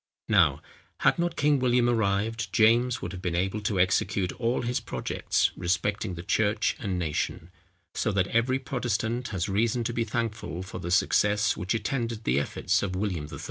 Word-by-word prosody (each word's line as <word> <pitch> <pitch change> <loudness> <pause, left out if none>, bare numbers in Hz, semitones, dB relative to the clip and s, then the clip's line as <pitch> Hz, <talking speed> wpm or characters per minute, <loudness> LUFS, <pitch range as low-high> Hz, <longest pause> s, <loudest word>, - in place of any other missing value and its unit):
Now, - - +4 0.4
had - - +3
not 170 -1 0
King 145 -1 +3
William 125 -1 +3
arrived, 110 0 0
James 115 +2 +3
would 90 - -4
have 90 -1 -7
been 90 -2 -2
able 95 +4 -1
to 100 -2 -1
execute 95 0 +1
all 120 +1 0
his 125 +3 0
projects 65 - -1
respecting 95 +2 -1
the 85 - -7
church 105 +3 +1
and 95 -4 -2
nation; 85 +1 -3 0.4
so 110 - 0
that 95 -2 +2
every 120 +3 +2
Protestant 120 -2 -2
has 95 -5 -2
reason 115 +4 +1
to 120 +1 -2
be 115 - 0
thankful 110 -5 -3
for 95 - -7
the 85 - -5
success, 105 +4 +3
which 90 +5 -2
attended 115 -2 -2
the 65 - +2
efforts 70 - 0
of 95 -2 -2
William 90 -6 -2
III. - - -7
110 Hz, 180 wpm, -27 LUFS, 95-120 Hz, 0.4 s, Now